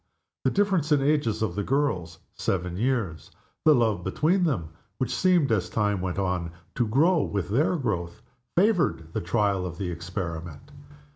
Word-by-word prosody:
The - - +5
difference 190 -7 +1
in 145 - +5
the 140 +2 +3
ages 115 -8 0
of 100 -6 -1
the 105 - -2
girls 95 - -1 0.2
seven 90 -2 -2
years 105 - -1 0.4
the 155 -1 +7
love 110 -7 +1
between 170 - +2
them, 90 - -1 0.3
which 130 - -1
seemed, 180 -8 +3
as 100 -5 +1
time 105 -3 0
went 90 -1 -3
on, 90 -3 -1 0.2
to 120 - 0
grow 155 +9 +3
with 100 -7 -2
their 145 - +2
growth, 105 - -3 0.3
favored 175 - +2
the - - -1
trial 100 +1 +1
of 85 -2 -5
the 90 -1 -3
experiment. 85 - -6
105 Hz, 165 wpm, -26 LUFS, 90-145 Hz, 0.4 s, the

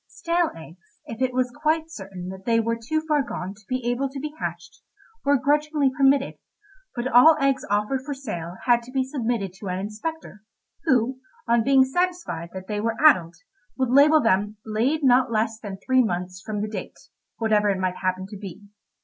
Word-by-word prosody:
Stale 340 0 0
eggs, 170 +3 -15
if 230 +2 -8
it 260 -1 +2
was 250 0 0
quite 315 +3 -1
certain 190 - -8
that 190 0 -9
they 230 -1 +3
were 230 +1 0
too 245 +8 -2
far 300 -2 +3
gone 190 -7 -5
to 205 - -20
be 255 -1 -2
able 245 +3 0
to 275 +1 -7
be 300 +2 -5
hatched, - - -6 0.4
were 285 0 +4
grudgingly 295 +1 +1
permitted, 275 0 +2 0.6
but 240 +1 -2
all 260 +6 +7
eggs 275 -1 +1
offered 210 +6 0
for 285 0 -4
sale 180 -10 -6
had 240 -1 +4
to 240 +2 -13
be 265 0 +1
submitted 235 -8 -2
to 195 +1 -9
an 180 0 -2
inspector, 215 +4 -6 0.4
who, 260 -3 +2 0.3
on 235 -1 +3
being 270 +1 +5
satisfied 350 - -2
that 190 0 -8
they 210 +1 -3
were 225 +1 -1
addled, 175 - +5 0.4
would 260 -2 0
label 295 +4 +6
them 210 -3 +1
"Laid 240 +8 0
not 255 -1 +4
less 220 0 0
than 200 -4 -7
three 260 -1 +4
months" 180 -3 -3
from 215 -2 -3
the - - -2
date, 215 - -7 0.4
whatever 215 -2 +2
it 195 - +1
might 185 -1 -2
happen 185 0 -2
to 205 +1 -9
be. 195 0 -9
235 Hz, 190 wpm, -24 LUFS, 205-275 Hz, 0.6 s, all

